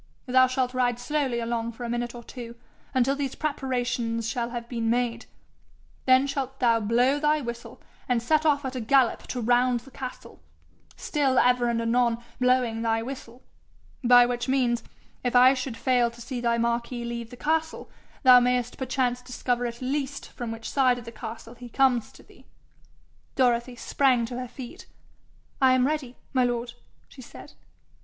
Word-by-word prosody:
Thou 255 0 +5
shalt 255 0 -1
ride 245 -2 +1
slowly 265 -1 -1
along 235 0 -2
for 240 - -9
a 235 - -4
minute 240 0 -3
or 240 - -9
two, 235 -1 -9 0.4
until 265 +1 +2
these 275 -2 -3
preparations 245 -5 -2
shall 235 0 -2
have 235 -1 -6
been 230 -2 -2
made; 235 0 -1 0.8
then 260 +1 +6
shalt 270 -1 -4
thou 235 -2 +3
blow 245 +6 +2
thy 300 +1 +2
whistle, 235 -3 -7 0.3
and 245 -1 +3
set 305 +6 +1
off 290 -2 +2
at 260 0 -4
a 255 - -3
gallop 255 +2 +2
to 250 - -4
round 245 +1 +2
the 270 +3 -16
castle, 255 -1 -9 0.5
still 275 -4 0
ever 245 -1 +3
and 235 -1 0
anon 235 0 +2 0.2
blowing 250 -3 +2
thy 225 0 0
whistle; 250 -1 -9 0.6
by 245 0 +7
which 245 +1 -2
means, 250 -3 +1 0.4
if 245 0 -1
I 255 +2 +7
should 255 -3 -4
fail 245 -1 +2
to 235 0 -16
see 245 +1 -5
thy 235 -1 +1
Marquis 235 +1 -1
leave 235 -1 -5
the 245 - -11
castle, 320 +3 -1 0.4
thou 255 -2 +9
mayest 245 0 0
perchance 255 -1 -1
discover 245 -1 -2
at 235 +1 -7
least 280 +1 -3
from 240 -3 -5
which 225 0 -7
side 255 -3 +2
of 240 - -9
the 230 - -8
castle 225 +1 -8
he 245 0 -11
comes 250 -2 +2
to - - -16
thee.' - - -21 0.9
Dorothy 245 -1 +1
sprang 250 -1 +2
to 245 +1 -6
her 250 - -5
feet. 245 0 -10 0.7
'I 260 -1 +6
am 255 0 +3
ready, 275 -4 -2 0.2
my 255 -1 +3
lord,' 240 0 -2 0.3
she 265 - -13
said. 235 - -12
245 Hz, 175 wpm, -26 LUFS, 235-260 Hz, 0.9 s, thou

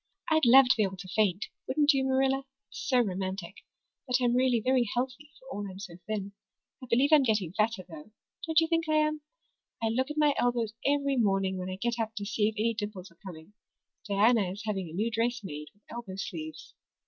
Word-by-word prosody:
I'd 315 -3 +4
love 260 +2 +8
to - - +4
be 220 - +1
able 190 -2 -1
to 185 +1 -9
faint, 200 0 +1 0.2
wouldn't 290 +2 +3
you, 270 -1 +1
Marilla? 265 0 +1 0.3
It's - - -6
so 255 -2 +5
romantic. 190 -2 -4 0.5
But 250 - 0
I'm 245 -1 +2
really 250 -2 +3
very 250 -1 +2
healthy 255 +4 -3
for 260 - -19
all 205 -1 -4
I'm 185 - -9
so 190 -4 -9
thin. 205 -2 -3 0.5
I - - -8
believe 265 +6 +3
I'm 300 - +8
getting 210 -9 0
fatter, 215 -2 0
though. 160 +1 -11 0.4
Don't 320 0 +4
you 325 - +2
think 330 -1 0
I 310 - +3
am? 305 0 +1 0.6
I 225 - 0
look 260 +5 0
at 300 - -6
my 300 -1 +4
elbows 240 -3 0
every 280 -1 +1
morning 195 -4 +1
when 185 0 -4
I 185 - -4
get 235 +4 -2
up 225 0 -2
to 205 - -4
see 210 0 +1
if 220 - -9
any 230 +2 +1
dimples 205 -4 -6
are 170 - -25
coming. 175 0 -10 0.6
Diana 205 0 +3
is 200 +3 -7
having 195 -5 -2
a - - -10
new 215 +6 -1
dress 235 +2 0
made 150 -4 -7
with 205 - -35
elbow 230 -6 -7
sleeves. 160 -5 -7
225 Hz, 220 wpm, -29 LUFS, 195-260 Hz, 0.6 s, love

